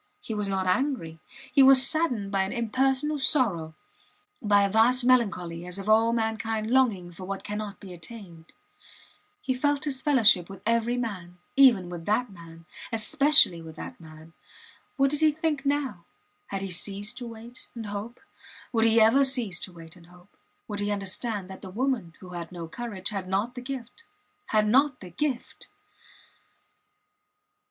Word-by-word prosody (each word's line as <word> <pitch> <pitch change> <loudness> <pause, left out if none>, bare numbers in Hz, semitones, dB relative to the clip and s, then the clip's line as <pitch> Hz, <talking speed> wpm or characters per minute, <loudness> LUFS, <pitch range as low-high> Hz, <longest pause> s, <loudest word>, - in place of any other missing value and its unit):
He 225 - -6
was 210 -2 -2
not 190 -1 -1
angry. 185 - -1 0.3
He 280 - +6
was 265 0 +8
saddened 255 -12 -1
by 195 -1 +1
an 190 - -2
impersonal 265 +5 0
sorrow, 200 - +1 0.7
by 205 -2 +4
a 200 - +1
vast 240 +4 +4
melancholy 195 -9 +1
as 180 +1 -5
of 195 +1 -7
all 225 +1 +4
mankind 225 -1 -2
longing 220 -10 +2
for 185 +2 -10
what 195 +1 -5
cannot 210 -1 -5
be 190 -2 -10
attained. 175 -3 -11 1.0
He 260 - 0
felt 290 +3 0
his 265 -3 -2
fellowship 230 - +4
with 195 - -11
every 230 +2 +1
man 185 -7 -5 0.2
even 245 -10 +5
with 175 -2 -8
that 220 +2 0
man 165 -2 -14 0.3
especially 235 - +5
with 160 -1 -11
that - - -9
man. 160 0 -14 0.6
What 275 0 +3
did 295 +1 -2
he 310 -1 +5
think 300 -2 -2
now? 280 -11 -1 0.4
Had 195 -1 -4
he 195 - -4
ceased 205 +6 -3
to 245 - -6
wait 230 +2 -12
and 230 -2 -6
hope? 205 +4 -6 0.5
Would 225 -1 +3
he 225 0 +4
ever 225 +6 +5
cease 245 -9 0
to - - -5
wait 165 -1 -13
and 170 -2 -18
hope? 180 +2 -20 0.3
Would 205 -2 -5
he 205 0 -1
understand 200 0 -3
that 190 - -10
the 190 - -9
woman, 225 -5 -2
who 185 - -11
had 175 -1 -7
no 170 -2 -7
courage, 205 0 -5
had 195 -4 -5
not 205 +6 -1
the 250 - -7
gift 255 - -8 0.5
had 215 -1 +2
not 265 +3 +3
the 180 -2 -11
gift! 265 - -4
215 Hz, 170 wpm, -26 LUFS, 185-255 Hz, 1.0 s, was